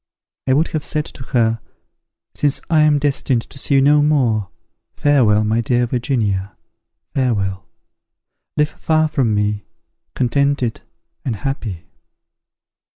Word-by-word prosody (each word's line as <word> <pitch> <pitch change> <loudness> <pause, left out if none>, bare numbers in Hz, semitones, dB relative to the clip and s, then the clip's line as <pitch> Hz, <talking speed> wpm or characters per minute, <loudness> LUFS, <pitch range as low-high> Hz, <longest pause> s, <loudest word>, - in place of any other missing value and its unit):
I 130 - +4
would 155 +5 +2
have 155 -2 -3
said 150 -1 -2
to - - -11
her, 115 -2 +1 0.7
'Since 145 -2 +1
I 155 -2 +5
am 150 -1 +4
destined 135 -4 0
to 135 - -11
see 140 - +1
you 135 - +5
no 145 +1 +5
more, 120 - +2 0.5
farewell, 120 -8 +3
my 110 +2 +1
dear 120 +1 +1
Virginia, 110 - -1 0.6
farewell! 100 - -1 0.9
Live 150 0 +3
far 155 0 +1
from 130 -8 +1
me, 105 0 0 0.5
contented 135 -1 0 0.4
and 120 - -2
happy!'" 105 -7 -4
125 Hz, 125 wpm, -19 LUFS, 110-145 Hz, 0.9 s, I